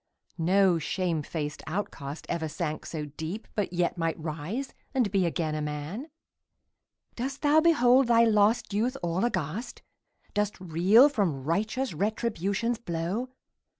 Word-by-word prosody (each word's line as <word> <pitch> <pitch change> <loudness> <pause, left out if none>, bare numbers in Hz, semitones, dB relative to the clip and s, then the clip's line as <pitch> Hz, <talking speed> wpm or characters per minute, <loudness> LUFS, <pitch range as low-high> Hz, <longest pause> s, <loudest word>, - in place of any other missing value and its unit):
No 185 +1 +4
shame 170 0 -1
faced 150 -1 -4
outcast 155 -5 -4
ever 165 -2 -2
sank 155 0 -4
so 155 -2 -4
deep, 160 +8 -6
But 205 -4 -1
yet 175 0 0
might 165 0 -1
rise 160 - -4 0.2
and 240 -7 +2
be 190 -3 +2
again 160 -2 -1
a 155 - -2
man! 150 - -4 1.1
Dost 270 +4 -4
thou 295 +1 +5
behold 265 -6 +5
thy 235 -1 +5
lost 220 0 +3
youth 240 +6 0
all 175 +3 0
aghast? 205 - -3 0.5
Dost 210 -1 -1
reel 185 - +5
from 185 - -1
righteous 215 - -1
Retribution's 215 +3 -1
blow? 180 +6 -3
190 Hz, 135 wpm, -28 LUFS, 160-230 Hz, 1.1 s, thou